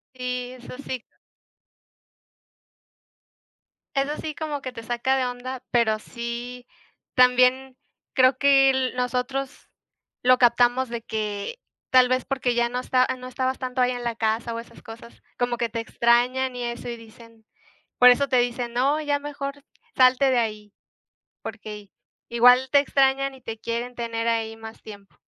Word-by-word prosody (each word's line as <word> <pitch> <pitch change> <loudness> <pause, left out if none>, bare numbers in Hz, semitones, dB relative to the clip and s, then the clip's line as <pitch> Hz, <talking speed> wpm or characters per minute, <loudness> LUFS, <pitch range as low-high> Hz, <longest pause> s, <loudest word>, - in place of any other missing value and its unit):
Sí, 250 0 -4
eso 250 0 -11
sí. 260 -3 -6 2.9
Eso 275 +2 0
sí 310 -1 -5
como 300 -3 -4
que 255 - -6
te 230 -2 -9
saca 240 +3 0
de 260 -1 +1
onda, 250 +1 -6
pero 220 -3 +2
sí, 240 +2 -7 0.5
también 255 +1 +4 0.4
creo 255 0 +4
que 275 -1 +5
l 260 -1 -1
nosotros 250 +2 -3 0.5
lo 255 0 +5
captamos 245 +1 +3
de 235 -1 -5
que 215 - -4 0.3
tal 255 -1 +6
vez 255 0 0
porque 255 -3 -1
ya 240 0 +2
no 250 +1 -3
esta 255 0 +2
ya 260 - -1
no 255 0 -9
estabas 260 +1 -2
tanto 255 -1 -2
ahí 250 - +3
en 245 -1 -5
la 235 -1 -2
casa 225 +1 -1
o 230 - -4
esas 235 0 -12
cosas 230 0 -12 0.2
como 245 -1 -1
que 235 0 -1
te 230 +1 -4
extrañan 245 +3 +1
y 245 - -4
eso, 240 0 -5
y 235 - -5
dicen, 230 0 -17 0.5
por 250 0 +9
eso 280 +3 +3
te 255 - +2
dicen: 240 -1 -1
"No, 275 +5 +2
ya 290 -1 0
mejor 285 -1 -6 0.3
salte 260 +1 +5
de 255 - +2
ahí", 210 -3 -3 0.7
porque 215 -1 -7
i 200 -1 -17 0.4
igual 250 +2 +5
te 285 0 +6
extrañan 275 -1 +1
y 265 - -15
te 225 -1 -6
quieren 235 +2 -4
tener 230 -1 -3
ahí 225 -1 -1
más 225 0 -11
tiempo. 200 -2 -13
250 Hz, 165 wpm, -24 LUFS, 235-260 Hz, 2.9 s, por